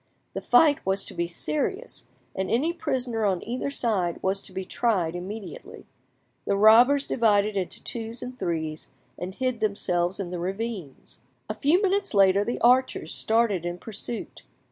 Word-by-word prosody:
The - - -4
fight 290 +3 +4
was 190 +1 +1
to - - -7
be 170 - -2
serious, 305 - -4 0.3
and 190 0 -3
any 295 +9 +1
prisoner 255 -9 -2
on 190 -4 0
either 250 +4 -2
side 205 -11 0
was 195 +1 +1
to - - -12
be 190 - -5
tried 185 -9 0
immediately. 205 - -8 0.6
The 200 - +1
robbers 240 +7 +6
divided 210 -3 +2
into 190 -2 -4
twos 230 -1 -5
and 250 0 -7
threes, 160 -2 -3 0.3
and 185 +2 -6
hid 255 -3 -1
themselves 185 -4 0
in 180 -3 -4
the 180 - -4
ravines. 190 - -5 0.3
A - - -3
few 285 +11 +2
minutes 395 - 0
later 195 0 +5
the 240 - -3
archers 255 +2 +2
started 220 -5 +1
in 175 0 -4
pursuit. 225 +4 -5
215 Hz, 160 wpm, -26 LUFS, 185-245 Hz, 0.6 s, robbers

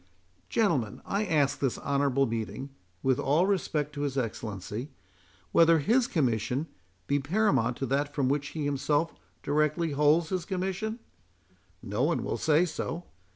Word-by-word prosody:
Gentlemen, 150 - +1
I 205 +2 0
ask 150 -5 +2
this 135 -4 0
honourable 140 -1 +1
meeting, 115 +4 -4 0.3
(with 130 -1 +2
all 150 +6 +3
respect 155 -7 0
to 145 - -5
his 140 -2 -2
Excellency,) 110 0 -4 0.6
whether 165 +4 +6
his 235 - +2
Commission 125 - 0 0.4
be 145 - +1
paramount 135 - +1
to 135 - -2
that 140 +2 0
from 140 -2 0
which 145 +1 0
he 150 0 -4
himself 145 +3 0 0.3
directly 150 +3 +1
holds 150 +3 +3
his 185 -2 -1
commission? 190 +4 -2 0.9
No 105 +4 -2
one 160 +5 +1
will - - -2
say 160 +2 +3
so. 165 0 -4
145 Hz, 145 wpm, -29 LUFS, 135-165 Hz, 0.9 s, whether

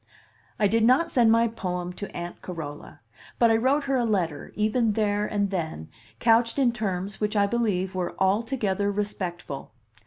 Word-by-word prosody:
I 205 - +3
did 225 +2 +2
not 255 +8 +4
send 235 -4 +4
my 230 +1 +4
poem 180 -5 -4
to 205 +2 -7
Aunt 175 0 -6
Carola, 155 -5 -8 0.4
but 235 -1 +5
I - - +5
wrote 265 +6 +2
her 275 -1 0
a 245 - +1
letter, 180 -10 -1
even 215 +1 +1
there 210 -1 0
and 200 -1 -1
then, 160 - -4 0.3
couched 230 +1 +3
in 260 -4 +3
terms 200 -3 -3
which 210 +1 0
I 205 -1 +4
believe 200 -4 0
were 180 -2 -3
altogether 205 0 +1
respectful. 185 -8 -4
205 Hz, 165 wpm, -26 LUFS, 185-230 Hz, 0.4 s, but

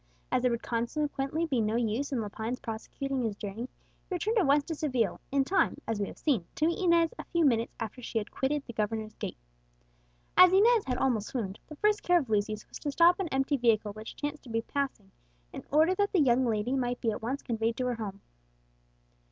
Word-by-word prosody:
As - - +2
there 250 - +3
would 235 -1 -2
consequently 275 +6 -1
be 265 -7 0
no 215 +1 0
use 235 +4 0
in 255 -4 0
Lepine's 220 +4 -4
prosecuting 265 +3 -4
his 220 -4 -1
journey, 210 +5 -6 0.4
he 370 - -1
returned 430 +6 +1
at 365 - +2
once 285 +1 +4
to 325 - -4
Seville, 255 - -1
in 275 0 +3
time, 380 +8 +1
as 225 -2 -1
we 200 - -1
have - - -10
seen, 260 - +1
to 305 - +1
meet 340 +3 0
Inez 340 -2 +4
a - - -4
few 340 -2 +1
minutes 230 -3 +2
after 225 +3 -5
she 230 - -4
had 210 - -2
quitted 285 +2 -1
the 235 - -8
governor's 215 0 -2
gate. - - -6 1.0
As 365 -1 +9
Inez 435 +3 +5
had 250 -1 -1
almost 230 -6 +1
swooned, 210 -7 -4
the 305 - -9
first 420 +5 +2
care 355 0 +4
of 270 -9 -2
Lucius 210 0 0
was - - -9
to 290 - -3
stop 345 +5 +5
an 385 - -1
empty 270 0 +1
vehicle 220 -4 +2
which 215 +1 -9
chanced 290 0 -4
to - - -11
be 225 0 -1
passing, 260 -8 -3 0.4
in - - -7
order 315 +5 +4
that 405 +2 0
the 375 - +4
young 255 -3 +4
lady 225 +3 0
might 245 -2 -1
be 225 - 0
at - - -5
once 255 +5 -3
conveyed 225 0 -1
to 255 - -1
her 250 - 0
home. 200 -3 -6
255 Hz, 225 wpm, -30 LUFS, 225-300 Hz, 1.0 s, As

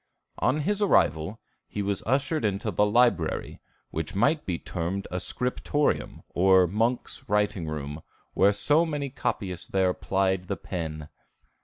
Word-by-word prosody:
On 150 +4 +2
his 205 +6 0
arrival 85 - +2 0.3
he 105 - -4
was 100 -1 -1
ushered 140 +4 +1
into 105 +1 -1
the 105 +3 +2
library, 105 -7 +1 0.3
which 80 +2 -4
might 140 +10 +2
be 90 -3 -1
termed 90 +4 -4
a 90 - -2
scriptorium, 125 +7 -1
or 95 0 +5
monks' 115 +8 -2
writing 105 -4 +1
room, 75 0 -5 0.5
so 145 +10 +4
many 145 -4 -3
copyists 95 -9 -3
there 95 -1 +2
plied 95 -1 0
the 100 - -2
pen. 80 -4 -5
100 Hz, 135 wpm, -27 LUFS, 90-125 Hz, 0.5 s, or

